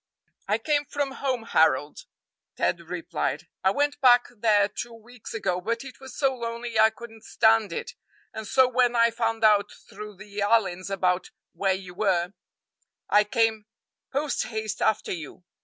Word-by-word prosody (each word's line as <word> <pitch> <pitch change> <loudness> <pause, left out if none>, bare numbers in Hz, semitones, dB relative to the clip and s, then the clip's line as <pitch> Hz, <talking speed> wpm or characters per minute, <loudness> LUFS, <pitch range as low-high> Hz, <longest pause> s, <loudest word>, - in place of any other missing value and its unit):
"I - - +2
came 295 -1 0
from 285 -1 -2
home, 260 -3 -2
Harold," 150 -7 +1 0.5
Ted 175 - 0
replied; 165 -4 -4 0.2
"I 190 - +5
went 290 +7 0
back 245 -2 +6
there 210 -2 +3
two 230 +3 -7
weeks 230 0 -11
ago, 180 -5 -1
but 230 +5 -2
it 270 -2 -11
was 265 -2 -11
so 275 -2 +2
lonely 235 -1 -4
I 220 0 +7
couldn't 225 0 -12
stand 220 -1 +3
it, 470 - -5 0.4
and 220 -1 -6
so 260 -1 +4
when 245 -1 +2
I 230 0 +4
found 225 -1 -2
out 210 -1 +5 0.2
through 210 0 -9
the 205 +1 -9
Allyns 200 -3 +1
about 185 -2 0 0.2
where 195 -1 +1
you 185 -2 -9
were, 185 -2 0 0.8
I 210 0 +5
came 220 -1 0 0.4
posthaste 225 -6 -2
after 220 - +1
you. 165 +1 -7
220 Hz, 155 wpm, -26 LUFS, 195-240 Hz, 0.8 s, I